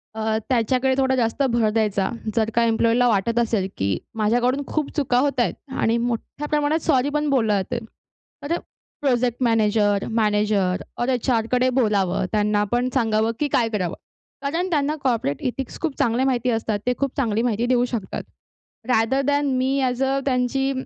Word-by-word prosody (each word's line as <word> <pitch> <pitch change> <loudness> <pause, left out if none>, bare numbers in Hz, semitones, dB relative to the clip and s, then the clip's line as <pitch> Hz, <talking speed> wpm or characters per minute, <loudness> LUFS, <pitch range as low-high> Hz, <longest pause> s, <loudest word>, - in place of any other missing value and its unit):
अ, 220 0 0
त्याच्याकडे 255 +2 +2
थोडा 265 -1 +2
जास्त 235 +1 0
भर 230 -2 +3
द्यायचा. 210 -3 0 0.3
जर 220 -1 +2
का 235 - +4
एम्प्लॉयला 230 +2 +3
वाटत 230 +1 +1
असेल, 220 -5 0
की 95 -1 0 0.2
माझ्याकडून 245 +5 +1
खूप 305 -2 -2
चुका 255 -4 +1
होत 280 -1 0
आहेत 240 - +2 0.3
आणि 230 +1 +2
मोठ्या 240 +5 -3
प्रमाणात 300 +1 +1
सॉरी 260 +2 +2
पण 300 0 +1
बोललं 225 -7 +2
जातंय. 240 +6 -3 0.7
तर 340 - +1 0.4
प्रोजेक्ट 250 -3 +1
मॅनेजर, 210 -3 +2
मॅनेजर 210 -3 +1 0.2
ओर 240 - 0
एच-आरकडे 250 0 +1
बोलावं, 195 -5 +1
त्यांनापण 210 +3 +1
सांगावं 225 -3 +1
की 295 - +1
काय 230 -2 +2
करावं? 190 -6 -2 0.5
कारण 330 +6 -1
त्यांना 300 -2 +1
कॉर्पोरेट 225 - 0
इथिक्स 265 0 -6
खूप 315 -5 -2
चांगल्या 240 +3 +2
माहिती 250 -2 +1
असतात. 225 -2 -1
ते 250 - +2
खूप 275 -2 -2
चांगली 225 -5 +1
माहिती 235 -1 0
देऊ 245 0 +2
शकतात. 210 -5 -4 0.6
Rather 250 +2 +2
than 285 0 +2
me 265 +2 +1
as 250 +1 -1
a 270 +1 +1
त्यांची 270 +1 +1
240 Hz, 160 wpm, -22 LUFS, 220-265 Hz, 0.7 s, का